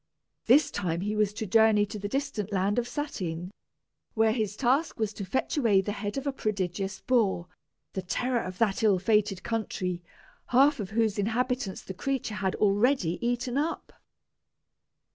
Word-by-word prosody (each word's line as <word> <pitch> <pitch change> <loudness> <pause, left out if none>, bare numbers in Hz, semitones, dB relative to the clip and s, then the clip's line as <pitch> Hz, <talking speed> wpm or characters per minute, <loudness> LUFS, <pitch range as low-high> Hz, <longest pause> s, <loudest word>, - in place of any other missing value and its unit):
This 270 +6 +5
time 175 -4 -2
he 210 +2 -2
was 210 -1 +2
to 220 - -4
journey 215 0 +4
to 210 +1 -7
the 205 - -3
distant 270 -4 -3
land 200 +3 +1
of 240 - -2
Satyn, 180 - -4 0.6
where 220 0 +4
his 215 -3 -1
task 270 +7 +1
was 215 -1 -1
to 205 - -6
fetch 260 - -2
away 225 -8 +4
the 195 +2 -1
head 205 +3 -4
of 275 - -3
a 280 - -1
prodigious 195 -4 -2
boar, 215 -9 +1 0.5
the 190 - -2
terror 245 +6 -1
of 185 0 -6
that 205 -2 +1
ill 210 -4 +4
fated 210 -1 +1
country, 195 -6 -2 0.5
half 275 +3 +4
of 200 -3 -4
whose 215 -1 +1
inhabitants 230 0 -1
the 190 - -7
creature 260 +2 -2
had 190 -2 -1
already 205 -3 +2
eaten 245 +2 0
up. 320 +3 -3
215 Hz, 165 wpm, -28 LUFS, 195-245 Hz, 0.6 s, This